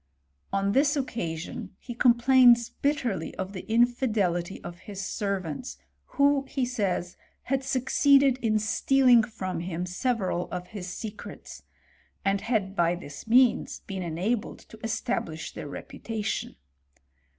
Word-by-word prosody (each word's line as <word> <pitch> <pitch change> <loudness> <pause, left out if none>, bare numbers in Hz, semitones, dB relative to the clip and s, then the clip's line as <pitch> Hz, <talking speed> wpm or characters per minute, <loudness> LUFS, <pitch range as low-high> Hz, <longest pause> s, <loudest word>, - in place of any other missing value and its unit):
On 195 0 +1
this 285 +6 +3
occasion 205 - -4
he 240 - -8
complains 240 0 +5
bitterly 250 - -1
of 190 +1 -5
the 190 +3 -7
infidelity 220 -7 +1
of 175 0 -8
his 195 0 -7
servants, 185 - -3 0.4
who, 280 0 +4
he 265 -3 0
says, 195 -7 -2 0.3
had 270 0 -1
succeeded 270 0 +3
in 220 -3 +1
stealing 245 +3 +4
from 190 -6 -4
him 175 0 -3
several 185 -2 -1
of 180 0 -6
his 195 -4 -7
secrets; 215 0 -8 0.6
and 195 0 +2
had 215 -4 -1
by 170 -1 +2
this 160 +1 -10
means 245 +1 +3
befen 195 -2 -5
enabled 185 +7 -2
to 220 - -13
establish 220 -8 -3
their - - -7
reputation. 215 +8 -4
215 Hz, 125 wpm, -27 LUFS, 185-250 Hz, 0.6 s, complains